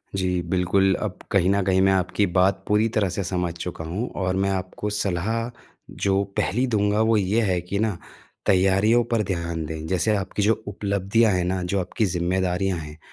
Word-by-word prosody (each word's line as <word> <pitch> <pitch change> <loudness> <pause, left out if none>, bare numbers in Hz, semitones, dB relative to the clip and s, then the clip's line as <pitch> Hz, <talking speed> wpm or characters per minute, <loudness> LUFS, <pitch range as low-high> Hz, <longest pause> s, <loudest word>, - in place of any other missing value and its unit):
जी, 90 -2 0
बिल्कुल। 90 +2 +2
अब - - -3
कहीं 95 -2 +3
न 100 +1 +2
कहीं 95 0 +2
मैं 95 - +4
आपकी 95 +2 +1
बात 95 +1 +2
पूरी 105 +2 +3
तरह 100 -3 +2
से 95 +3 -3
समझ 90 -1 -2
चुका 85 -1 -5
हूँ। 95 +10 -3
और 95 -1 -1
मैं 95 +1 +1
आपको 95 +2 -3
सलाह 105 +3 -1 0.6
जो 100 0 +3
पहली 125 +7 +1
दूँगा 105 -2 +1
वो 110 0 +3
ये 105 +3 +1
है 95 -5 +1
कि 95 +3 -3
ना, 110 -4 0 0.5
तैयारियों 95 +5 +4
पर 115 -2 +2
ध्यान 85 -4 -3
दें। 80 0 -6
जैसे 95 +4 +1
आपकी 100 +1 -2
जो 110 +1 +1
उपलब्धियाँ 100 +2 +1
हैं 90 -1 +1
ना, 95 +1 -1
जो 95 +2 -1
आपकी 95 +4 -1
ज़िम्मेदारियाँ 90 +1 0
हैं, 75 -1 -9
95 Hz, 190 wpm, -24 LUFS, 90-105 Hz, 0.6 s, मैं